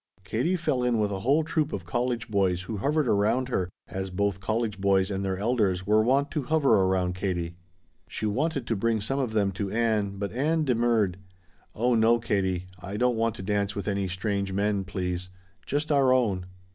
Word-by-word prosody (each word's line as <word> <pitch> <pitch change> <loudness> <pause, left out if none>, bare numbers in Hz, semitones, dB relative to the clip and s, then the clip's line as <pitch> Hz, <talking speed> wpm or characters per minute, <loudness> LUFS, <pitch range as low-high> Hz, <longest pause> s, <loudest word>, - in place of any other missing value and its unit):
Katie 125 - 0
fell 155 -7 0
in 125 -1 +2
with 105 -1 +1
a 95 - -3
whole 140 +10 +2
troop 155 -1 -1
of 90 -4 -5
college 120 +4 -1
boys 95 -3 +1
who 105 +3 -5
hovered 145 +6 +1
around 110 +5 +2
her, 95 -7 -1 0.2
as 95 0 -4
both 100 +1 -1
college 110 0 -2
boys 95 0 +2
and 95 0 -2
their 95 -1 -1
elders 100 -4 +1
were 105 +2 +4
wont 135 +5 +2
to 155 - -1
hover 140 -2 +2
around 95 -1 +1
Katie. 90 -3 -3 0.5
She - - -4
wanted 135 +5 0
to 115 - -1
bring 115 +2 +1
some 135 +7 -2
of 125 -5 -1
them 100 -2 +2
to 95 +1 -3
Ann, 105 -2 0
but 100 0 -3
Ann 155 +6 +1
demurred. 115 -7 +2 0.6
"Oh 120 +3 +2
no, 115 +1 +4
Katie. 95 -5 -1
I 95 +3 -6
don't 125 +1 +2
want 115 -1 0
to 95 - -7
dance 100 0 -1
with 100 - -4
any 100 -1 0
strange 100 +1 -2
men, 100 0 0
please. 90 -1 -3 0.4
Just 150 +2 -1
our 135 -3 +4
own." 105 -8 +1
105 Hz, 195 wpm, -27 LUFS, 95-125 Hz, 0.6 s, were